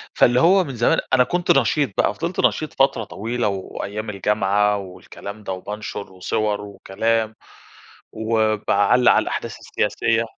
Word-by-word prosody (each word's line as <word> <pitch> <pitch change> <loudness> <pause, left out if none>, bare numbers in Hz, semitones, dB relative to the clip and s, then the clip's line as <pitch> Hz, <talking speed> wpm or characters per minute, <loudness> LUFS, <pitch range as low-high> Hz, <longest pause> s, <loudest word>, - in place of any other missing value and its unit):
فاللي 120 +1 +4
هو 185 +6 +5
من 135 -6 -7
زمان 120 +1 +2
أنا 130 -1 +6
كنت 175 +6 0
نشيط 135 0 +2
بقى، - - +2
فضلت 170 +2 -4
نشيط 155 - +1
فترة 135 -4 +2
طويلة 115 +4 -3
وأيام 100 +2 -5
الجامعة 105 0 +1
والكلام 100 +2 -9
ده، 95 - -3
وبانشر 105 +1 -6
وصور 105 +3 -1
وكلام، 110 +3 -2 0.8
وباعلّق 110 +1 +2
على - - +3
الأحداث - - -4
السياسية. 115 0 0
110 Hz, 135 wpm, -21 LUFS, 100-125 Hz, 0.8 s, أنا